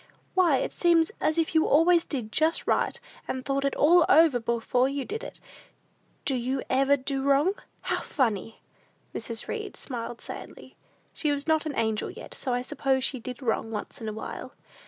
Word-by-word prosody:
Why, 345 Hz, -7 st, +4 dB
it -, -, -2 dB
seems 335 Hz, -2 st, +3 dB
as 310 Hz, -, +1 dB
if 325 Hz, -1 st, +1 dB
you 320 Hz, -1 st, +4 dB
always 330 Hz, +3 st, +5 dB
did 240 Hz, -7 st, -4 dB
just 315 Hz, +5 st, +1 dB
right, -, -, +1 dB, 0.3 s
and 260 Hz, 0 st, -4 dB
thought 275 Hz, 0 st, 0 dB
it 275 Hz, -, 0 dB
all 340 Hz, +4 st, +6 dB
over 310 Hz, -4 st, +6 dB
before 235 Hz, +2 st, +1 dB
you 275 Hz, -1 st, -3 dB
did 445 Hz, +4 st, -5 dB
it. -, -, -9 dB, 0.9 s
Do 275 Hz, -, +1 dB
you 255 Hz, +1 st, -1 dB
ever 275 Hz, +2 st, +4 dB
do 270 Hz, 0 st, -2 dB
wrong? 280 Hz, +7 st, +3 dB, 0.3 s
How -, -, -1 dB
funny!" 225 Hz, -5 st, -1 dB, 0.5 s
Mrs. 230 Hz, -1 st, -4 dB
Read 430 Hz, -3 st, -5 dB
smiled 240 Hz, -2 st, -5 dB
sadly. -, -, -9 dB, 0.4 s
She 300 Hz, -, 0 dB
was 285 Hz, 0 st, -2 dB
not 315 Hz, -1 st, +2 dB
an 290 Hz, -, -4 dB
angel 220 Hz, -2 st, 0 dB
yet; 445 Hz, +7 st, -9 dB
so 260 Hz, -, -3 dB
I 245 Hz, 0 st, 0 dB
suppose 265 Hz, 0 st, 0 dB
she 260 Hz, -, 0 dB
did 250 Hz, +3 st, -7 dB
wrong 225 Hz, -1 st, 0 dB
once 215 Hz, +1 st, -6 dB
in 220 Hz, -, -3 dB
a -, -, -5 dB
while. 220 Hz, -, -7 dB
275 Hz, 185 wpm, -27 LUFS, 245-315 Hz, 0.9 s, all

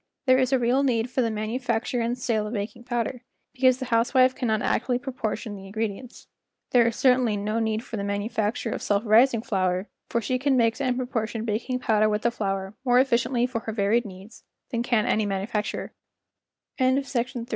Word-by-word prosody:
There 255 Hz, -1 st, +5 dB
is 255 Hz, 0 st, +1 dB
a 265 Hz, -, +4 dB
real 245 Hz, +2 st, +2 dB
need 245 Hz, -3 st, 0 dB
for 260 Hz, -, +1 dB
the 230 Hz, -, +1 dB
manufacture 230 Hz, +2 st, -2 dB
and 235 Hz, +2 st, -1 dB
sale 225 Hz, -4 st, -1 dB
of 215 Hz, -, -6 dB
baking 230 Hz, +3 st, -5 dB
powder, 240 Hz, 0 st, -2 dB, 0.3 s
because 255 Hz, -1 st, +3 dB
the 260 Hz, -, -5 dB
housewife 255 Hz, +3 st, +4 dB
cannot 220 Hz, -4 st, -1 dB
accurately 245 Hz, +1 st, +1 dB
proportion 245 Hz, -4 st, -4 dB
the 195 Hz, -, -9 dB
in¬ 195 Hz, 0 st, -11 dB
gredients. 225 Hz, +3 st, -4 dB, 0.5 s
There 240 Hz, -2 st, +5 dB
is 230 Hz, -, -1 dB
certainly 250 Hz, -5 st, +3 dB
no 215 Hz, +3 st, -1 dB
need 220 Hz, 0 st, -1 dB
for 230 Hz, -, -6 dB
the 200 Hz, -, -3 dB
manufacture 210 Hz, +3 st, -2 dB
of -, -, -4 dB
self¬ 205 Hz, +2 st, 0 dB
rising 230 Hz, +2 st, +4 dB
flour, 185 Hz, -2 st, -1 dB, 0.2 s
for 235 Hz, -, +1 dB
she 255 Hz, +3 st, -1 dB
can 270 Hz, 0 st, +2 dB
mix 230 Hz, +2 st, +2 dB
and 255 Hz, -2 st, 0 dB
proportion 225 Hz, -3 st, -3 dB
baking 240 Hz, +4 st, -2 dB
powder 215 Hz, -2 st, +3 dB
with 210 Hz, 0 st, -1 dB
the 235 Hz, -, +2 dB
flour 195 Hz, -3 st, -3 dB
more 245 Hz, -2 st, +3 dB
efficiently 245 Hz, -1 st, +2 dB
for 250 Hz, -2 st, -3 dB
her 225 Hz, -1 st, -5 dB
varied 215 Hz, +3 st, +1 dB
needs 195 Hz, +2 st, -12 dB, 0.3 s
than 235 Hz, -2 st, -1 dB
ca 235 Hz, -3 st, +1 dB
230 Hz, 180 wpm, -25 LUFS, 215-250 Hz, 0.5 s, There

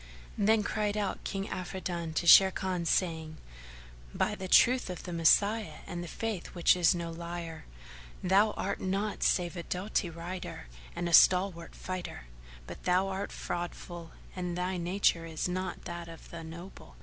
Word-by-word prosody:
Then 215 Hz, +1 st, +4 dB
cried 210 Hz, 0 st, -1 dB
out 200 Hz, -3 st, -2 dB
King 195 Hz, +1 st, -3 dB
Afridun 175 Hz, -3 st, -4 dB
to 175 Hz, -, 0 dB
Sharrkan, 185 Hz, -1 st, +6 dB
saying, 160 Hz, -4 st, 0 dB, 0.8 s
"By -, -, +1 dB
the 190 Hz, -, -5 dB
truth 250 Hz, +4 st, +5 dB
of 180 Hz, -, -6 dB
the 175 Hz, -, -6 dB
Messiah 200 Hz, +2 st, +3 dB
and 175 Hz, 0 st, -5 dB
the -, -, -7 dB
Faith 215 Hz, 0 st, -4 dB
which 175 Hz, -, +5 dB
is 180 Hz, -1 st, +4 dB
no 170 Hz, -1 st, -4 dB
liar, 170 Hz, -1 st, -6 dB, 0.6 s
thou 195 Hz, +4 st, +4 dB
art 200 Hz, +1 st, -3 dB
nought 195 Hz, +3 st, -2 dB
save 175 Hz, -1 st, +1 dB
a 175 Hz, -, -4 dB
doughty 185 Hz, +2 st, -2 dB
rider 170 Hz, -, -7 dB, 0.3 s
and 175 Hz, -, -2 dB
a 170 Hz, -, -3 dB
stalwart 180 Hz, -1 st, +5 dB
fighter; 185 Hz, -, -6 dB, 0.4 s
but -, -, -9 dB
thou 185 Hz, +2 st, +2 dB
art 195 Hz, +1 st, -4 dB
fraudful 175 Hz, -1 st, -5 dB, 0.3 s
and 180 Hz, -1 st, -3 dB
thy 180 Hz, +1 st, -1 dB
nature 175 Hz, -1 st, +1 dB
is 160 Hz, +1 st, -2 dB
not 185 Hz, 0 st, -4 dB
that 175 Hz, -1 st, -6 dB
of 165 Hz, -1 st, -12 dB
the 170 Hz, -1 st, -7 dB
noble. 165 Hz, -, -11 dB
180 Hz, 160 wpm, -30 LUFS, 170-190 Hz, 0.8 s, Sharrkan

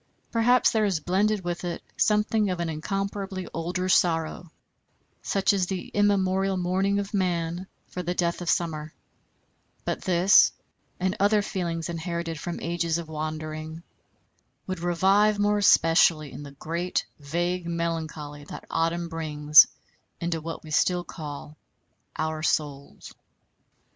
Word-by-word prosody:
Possibly 245 Hz, +2 st, +4 dB
there 220 Hz, -1 st, +2 dB
is 190 Hz, -5 st, 0 dB
blended 195 Hz, +5 st, +1 dB
with 175 Hz, 0 st, -3 dB
it 175 Hz, -1 st, -4 dB
something 210 Hz, 0 st, +2 dB
of 180 Hz, -1 st, -2 dB
incomparably 190 Hz, +4 st, -3 dB
older 175 Hz, +3 st, -2 dB
sorrow 165 Hz, -1 st, +1 dB, 0.7 s
such 195 Hz, +1 st, +1 dB
as 190 Hz, -2 st, +1 dB
the 185 Hz, -1 st, -4 dB
immemorial 195 Hz, -2 st, +2 dB
mourning 190 Hz, +3 st, +1 dB
of 200 Hz, +1 st, -3 dB
man 175 Hz, -2 st, -1 dB, 0.2 s
for 180 Hz, -, -6 dB
the 175 Hz, +1 st, -3 dB
death 170 Hz, 0 st, 0 dB
of 175 Hz, -, -3 dB
summer; 155 Hz, -2 st, -1 dB, 0.9 s
but -, -, -2 dB
this, 185 Hz, +2 st, +5 dB, 0.5 s
and 185 Hz, +1 st, 0 dB
other 205 Hz, +1 st, +3 dB
feelings 170 Hz, -4 st, -3 dB
inherited 170 Hz, -1 st, -4 dB
from 175 Hz, +1 st, -5 dB
ages 170 Hz, -1 st, -1 dB
of 170 Hz, -2 st, -6 dB
wandering, 155 Hz, +1 st, -5 dB, 0.8 s
would 185 Hz, -2 st, -4 dB
revive 195 Hz, +5 st, +3 dB
more 205 Hz, 0 st, +2 dB
especially 165 Hz, -5 st, +4 dB
in -, -, -8 dB
the 140 Hz, -1 st, -10 dB
great 170 Hz, +5 st, -2 dB
vague 175 Hz, +4 st, -2 dB
melancholy 160 Hz, -3 st, -4 dB
that -, -, -9 dB
autumn 165 Hz, +1 st, 0 dB
brings 150 Hz, -2 st, +5 dB, 0.5 s
into 170 Hz, -1 st, -2 dB
what 165 Hz, +1 st, -6 dB
we 155 Hz, -, -10 dB
still 180 Hz, +3 st, +2 dB
call 150 Hz, -3 st, -8 dB, 0.6 s
our 155 Hz, -1 st, -2 dB
souls. 145 Hz, -3 st, -2 dB
175 Hz, 130 wpm, -26 LUFS, 160-190 Hz, 0.9 s, this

